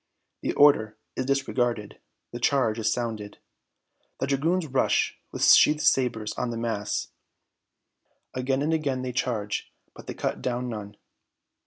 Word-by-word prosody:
The - - -1
order 110 -7 +4 0.2
is 130 - -2
disregarded! 120 -5 -1 0.3
The 120 - -6
charge 120 -4 +2
is 110 - +1
sounded! 110 -4 -3 0.8
The - - 0
dragoons 160 +6 +1
rush 135 -3 +1
with - - -3
sheathed 150 0 +6
sabres 115 -5 +2
on 125 - -1
the 115 - -4
mass! 115 -3 -2 1.2
Again 130 +2 0
and 160 +2 +1
again 140 -5 -1
they 130 - -3
charge, 110 -4 -2 0.2
but - - -13
they - - -5
cut - - -3
down 125 0 -2
none! 105 -2 -7
125 Hz, 140 wpm, -26 LUFS, 110-135 Hz, 1.2 s, sheathed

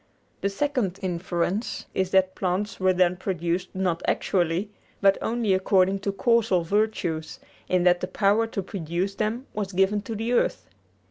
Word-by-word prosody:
The 200 - +1
second 220 -4 -1
inference 180 +3 -2
is 190 -1 0
that 190 -1 +3
plants 195 +2 -2
were 185 0 +3
then 180 -1 +2
produced 180 -1 -2
not 180 -3 0
actually, 180 +2 0 0.3
but 195 -1 +4
only 230 -3 0
according 190 0 +3
to 200 +1 -2
causal 225 -4 +2
virtues, 175 -4 -1 0.3
in 180 -1 +2
that 175 0 +4
the 185 - -2
power 205 +4 +2
to 200 -3 -4
produce 180 +1 -3
them 220 +5 -2
was 200 -2 -3
given 195 +3 +2
to 220 +2 -6
the 225 +3 -2
earth. - - +1
190 Hz, 155 wpm, -25 LUFS, 180-210 Hz, 0.3 s, but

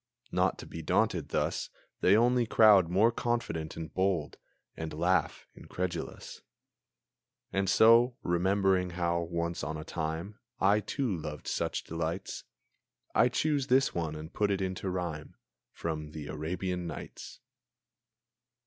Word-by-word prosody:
Not - - +1
to - - -9
be 80 - -7
daunted 75 - +1
thus, - - -1 0.3
They 100 +3 +5
only 120 0 +3
crowd 105 -7 +6
more 100 +6 +4
confident 115 -11 -2
and 80 -2 -6
bold, 95 -6 0 0.4
And 80 0 -5
laugh, 90 +4 +1
incredulous. 90 -2 -5 1.1
And 95 -1 +1
so, 115 +4 +6
remembering 95 +1 +2
how, 85 -1 +1
once 85 -1 -3
on 80 +2 -3
a 75 - -6
time, 85 +8 -4 0.2
I, 100 +2 +4
too, 110 +1 -2
loved 75 -2 -6
such - - -1
delights, 85 +3 -4 0.7
I 120 - +5
choose 145 +1 0
this 135 0 +3
one 80 -3 -2
and 80 +2 -8
put 105 -1 +1
it 100 -1 0
into 95 0 -3
rhyme, 85 -4 -4 0.4
From 75 -2 -5
the 75 -2 -7
"Arabian 90 +3 -3
Nights." - - -8
90 Hz, 130 wpm, -30 LUFS, 80-105 Hz, 1.1 s, crowd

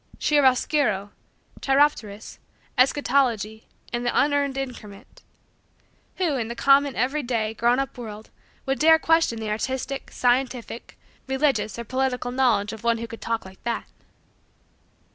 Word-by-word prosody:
"Chiaroscuro," 265 -7 +2 0.5
"cheiropterous," 270 -7 0 0.4
"eschatology," 250 -5 +1 0.3
and 240 0 -1
the 240 - +1
"unearned 285 -1 +1
increment" 240 -4 -8 0.9
who, 335 -7 0
in 230 -3 -2
the 235 - -5
common, 275 +1 +4
every 270 +6 0
day, 230 -4 -1
grown 235 +2 +2
up, 270 0 -2
world, 215 -2 -9 0.3
would 270 0 -1
dare 320 +1 +7
question 325 -8 +2
the 215 -1 -3
artistic, 260 +5 -3
scientific, 245 -1 -1 0.3
religious, 265 -6 0
or 235 - -4
political, 255 0 -1
knowledge 230 -5 +1
of 220 0 -10
one 235 0 +2
who 230 - -5
could 230 0 -10
talk 230 -2 -2
like 190 0 -14
that? 235 0 -2
250 Hz, 130 wpm, -24 LUFS, 225-275 Hz, 0.9 s, dare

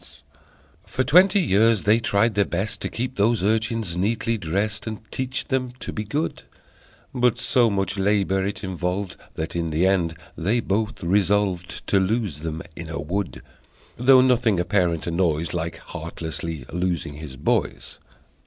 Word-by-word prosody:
For 130 - 0
twenty 185 +7 +5
years 110 - +3
they 110 +3 +4
tried 115 0 +2
their 100 0 +3
best 95 +3 -3
To - - -2
keep 125 +2 -4
those 110 0 +2
urchins 110 -3 0
neatly 115 +5 0
dressed 100 +3 -2
And 110 -1 -4
teach 130 +1 -3
them 130 -2 -1
to - - -5
be 105 - -3
good, 145 +10 -2 0.7
But 125 -2 +2
so 120 -4 +3
much 100 -1 -1
labor 95 -1 +2
it 100 +3 -4
involved 95 +1 -2 0.2
That, 80 +2 -4
in 85 -1 -1
the 80 +4 +1
end, 90 -4 +2 0.2
they 105 +8 +1
both 110 0 -1
resolved 95 0 +1
To 100 - +3
lose 95 - 0
them 80 0 -4
in 85 -1 -7
a 80 - -4
wood, 85 0 -3 0.5
Though 130 +2 +6
nothing 120 -6 +3
a 90 - 0
parent 90 -4 +1
annoys 85 -2 0
Like 85 -1 -3
heartlessly 80 -4 -6
losing 90 -4 -1
his 75 -4 -9
boys! 70 - -1
100 Hz, 155 wpm, -24 LUFS, 85-115 Hz, 0.7 s, Though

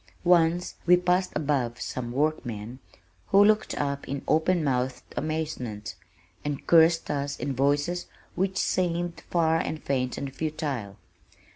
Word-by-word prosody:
Once 175 0 +3
we 180 +1 +7
passed 180 +1 +1
above 135 -6 0
some 120 -2 -4
workmen, 125 -5 -2 0.5
who 200 +1 +6
looked 215 0 +2
up 140 -1 -2
in 140 0 -3
open 165 +2 +2
mouthed 130 -2 -1
amazement, 150 -9 -3 0.5
and 145 -1 -4
cursed 165 0 +5
us 140 -1 -2
in 140 - -2
voices 145 +6 +1 0.3
which 190 +1 -1
seemed 175 -2 0
far 165 -2 +3
and 155 - -4
faint 130 -2 -1
and 135 -1 -5
futile. 140 -10 -3
150 Hz, 130 wpm, -27 LUFS, 135-170 Hz, 0.5 s, we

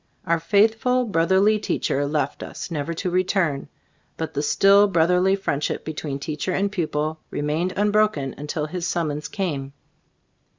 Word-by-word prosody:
Our 170 -1 +1
faithful, 225 +8 +2
brotherly 195 +3 +3
teacher 145 -8 -1
left 145 -2 -2
us, - - -7
never 155 0 -2
to 180 +2 -2
re 185 +1 +2
turn; 170 -7 -1 0.5
but 160 -1 -4
the 145 - -1
still 195 +6 +5
brotherly 180 +1 +3
friendship 150 -7 -2
between 150 -2 -4
teacher 150 +5 -3
and 200 +2 0
pupil 155 -4 -2
remained 155 +5 -1
unbroken 205 -9 +2
until 150 +1 -3
his 175 +2 -4
summons 150 -3 -2
came. 145 -9 -3
170 Hz, 140 wpm, -23 LUFS, 150-195 Hz, 0.5 s, still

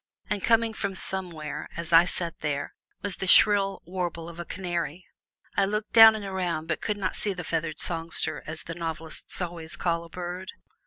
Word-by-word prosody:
And 205 -2 0
coming 230 -1 +3
from 200 -2 -3
somewhere, 175 -6 -5
as 170 0 -4
I 165 +1 +9
sat 170 -2 -3
there, 145 -2 -2 0.3
was 200 -3 -2
the 190 - -3
shrill 200 0 +5
warble 175 -2 -3
of 170 0 -11
a 175 - -4
canary. 175 -2 -3 0.5
I 200 - +4
looked 210 +2 -2
down 225 -1 +10
and 210 -2 -5
around, 180 -4 -2
but 160 - -1
could 210 - -1
not 190 -2 -2
see 205 - -1
the 180 -1 -6
feathered 160 -2 -2
songster, 165 -1 0
as 155 0 -6
the 165 - -6
novelists 160 -1 -4
always 170 -3 -5
call 170 -1 0
a 170 - -12
bird. 180 +2 -6
175 Hz, 190 wpm, -27 LUFS, 165-195 Hz, 0.5 s, down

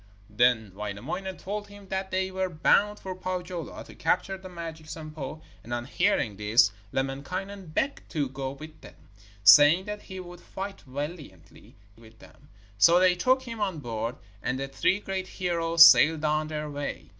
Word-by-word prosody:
Then 110 -2 +2
Wainamoinen 125 - -5
told 205 +1 -5
him 200 -1 -14
that 190 0 -3
they 190 0 -1
were 190 0 -1
bound 200 +5 +2
for 190 - -6
Pohjola 180 -3 -5
to - - -14
capture 195 - 0
the 190 0 -11
magic 165 -3 -8
Sampo, 155 -2 -7 0.2
and, 120 - -11
on 120 0 -4
hearing 140 - 0
this, 105 +1 +4 0.2
Lemminkainen 180 +9 -4
begged 275 - -2
to 145 -4 -1
go 135 +1 -5
with 155 +3 -11
them, - - -13 0.5
saying 145 - +8
that 210 0 -6
he 190 -1 -9
would 175 -1 -10
fight 195 +1 -7
valiantly 140 - -8 0.2
with 115 0 -18
them. 140 +5 -19 0.3
So 170 +11 +7
they 185 0 +5
took 255 +9 +2
him 230 -3 -7
on 190 -5 -1
board, 115 -3 -4 0.3
and 125 +4 -2
the 135 - -3
three 190 +8 +1
great 190 -2 -4
heroes 170 -3 +5
sailed 160 -1 +6
on 155 0 +1
their 150 -1 -4
way. 145 -1 -6
165 Hz, 165 wpm, -27 LUFS, 135-190 Hz, 0.5 s, saying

